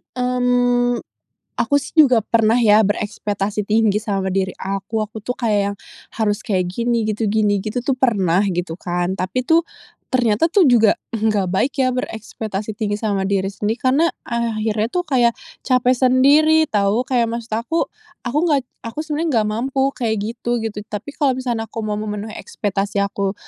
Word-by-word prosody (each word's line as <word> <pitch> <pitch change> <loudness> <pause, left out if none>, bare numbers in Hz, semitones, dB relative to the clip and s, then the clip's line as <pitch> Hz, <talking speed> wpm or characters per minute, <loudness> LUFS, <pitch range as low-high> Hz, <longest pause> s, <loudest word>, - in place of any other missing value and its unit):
Mmm, 245 -1 +2 0.6
aku 285 - +1
sih 325 - -11
juga 255 -7 +6
pernah 225 0 +2
ya 220 -3 +5
berekspektasi 205 0 -2
tinggi 215 -1 +2
sama 200 -3 -2
diri 190 0 -1
aku, 195 +3 -3
aku 215 +1 -5
tuh 250 - -1
kayak 205 -4 0
yang - - -13 0.4
harus 215 -1 -1
kayak 185 -6 0
gini, 235 +4 0
gitu 215 +1 -1
gini, 210 -1 +2
gitu 215 +5 -3
tuh 260 +1 -1
pernah 195 -9 +2
gitu 175 -3 -2
kan. 175 +1 -2
Tapi 185 +7 -1
tuh 325 +6 +3 0.5
ternyata 235 0 +3
tuh 380 0 +4
juga 225 -4 +5 0.2
enggak 215 -4 0
baik 225 +9 0
ya 255 - +3
berekspektasi 220 -4 -5
tinggi 210 -2 -1
sama 205 -2 -1
diri 195 0 0
sendiri. 215 +4 -3
Karena 275 +4 +3 0.2
akhirnya 220 -2 -1
tuh 360 - +1
kayak 250 -8 +2 0.3
capek 255 -1 +3
sendiri 290 +5 +4
tahu, 205 +2 +2
kayak 245 -2 +2
maksud 230 0 -5 0.2
aku 330 +6 0 0.3
aku 255 +3 -2
nggak 290 -5 +2 0.2
aku 230 +7 -4
sebenernya 305 -5 0
nggak 210 - -1
mampu 265 +5 0
kayak 230 -3 0
gitu, 235 +2 -2
gitu. 220 -2 -4
Tapi 210 +5 -6
kalo 275 -3 +2
misalkan 245 -3 -2
aku 225 +1 -6
mau 210 -1 -2
memenuhi 210 0 -5
ekspektasi 200 - -2
aku 200 0 -1
225 Hz, 165 wpm, -20 LUFS, 205-250 Hz, 0.6 s, juga